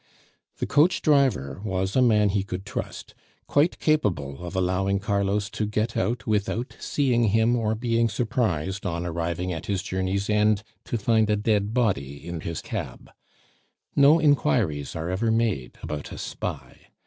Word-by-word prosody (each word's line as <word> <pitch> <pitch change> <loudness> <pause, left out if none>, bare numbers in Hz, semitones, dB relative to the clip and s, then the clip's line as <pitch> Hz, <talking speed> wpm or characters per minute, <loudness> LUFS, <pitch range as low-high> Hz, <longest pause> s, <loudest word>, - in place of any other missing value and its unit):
The - - -2
coach 155 +5 +3
driver 130 - +2
was 95 -2 -2
a 130 - +4
man 105 -4 +4
he 100 0 +1
could 95 0 -6
trust, - - -6 0.3
quite 150 +4 +2
capable 90 - 0
of 90 +2 -6
allowing 95 +2 +1
Carlos 100 0 0
to 105 - -2
get 110 +2 -1
out 115 +6 -1
without 110 +3 -1
seeing 125 -5 +1
him, 110 +3 +3
or 110 -2 0
being 115 0 +1
surprised, 100 - -1
on 85 -2 -2
arriving 85 +1 -2
at 80 - -6
his 95 -2 -1
journey's 95 +1 -1
end, 105 0 +2 0.2
to 120 - -2
find 110 0 +2
a 105 - +3
dead 105 -1 +1
body 70 - -1
in 85 -1 -4
his 85 0 -4
cab. - - -6 0.8
No 145 +4 +6
inquiries 75 - +1
are 80 +2 -3
ever 110 +5 0
made 110 - 0
about 75 -1 -5
a - - -7
spy. - - -6
105 Hz, 160 wpm, -25 LUFS, 90-115 Hz, 0.8 s, No